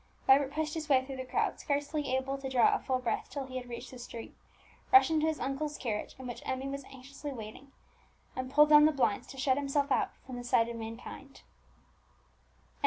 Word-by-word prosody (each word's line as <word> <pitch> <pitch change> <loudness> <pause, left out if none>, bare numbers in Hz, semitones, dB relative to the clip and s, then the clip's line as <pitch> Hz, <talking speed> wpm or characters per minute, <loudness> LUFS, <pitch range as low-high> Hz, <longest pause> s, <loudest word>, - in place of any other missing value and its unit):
Vibert 270 +1 +5
pushed 305 0 -2
his 315 -2 -4
way 260 -2 +4
through 270 -1 -7
the 260 - -4
crowd, - - -1
scarcely 290 -1 -1
able 265 +1 -1
to 275 -1 -5
draw 260 - +4
a 415 - +1
full 260 -2 0
breath 250 -2 -2
till 280 -2 -4
he 260 0 -6
had 250 -1 -7
reached 240 +1 -7
the 255 - -10
street, 235 -1 -8 0.6
rushed 390 -4 +7
into 315 0 +2
his 315 -1 -1
uncle's 280 +3 -2
carriage, 215 -5 -3
in 260 - -9
which 245 -1 -6
Emmie 260 +1 -3
was 275 0 -4
anxiously 275 +2 -9
waiting, 240 +3 -9 0.6
and 255 0 -3
pulled 300 +2 +6
down 300 0 +8
the 310 - +5
blinds 260 -8 0
to 270 - -10
shut 260 0 +2
himself 280 0 0
out - - +2 0.2
from 255 -2 -7
the 245 - -6
sight 230 -1 +3
of 235 - -5
mankind. 230 +4 -8
270 Hz, 210 wpm, -31 LUFS, 255-290 Hz, 0.6 s, down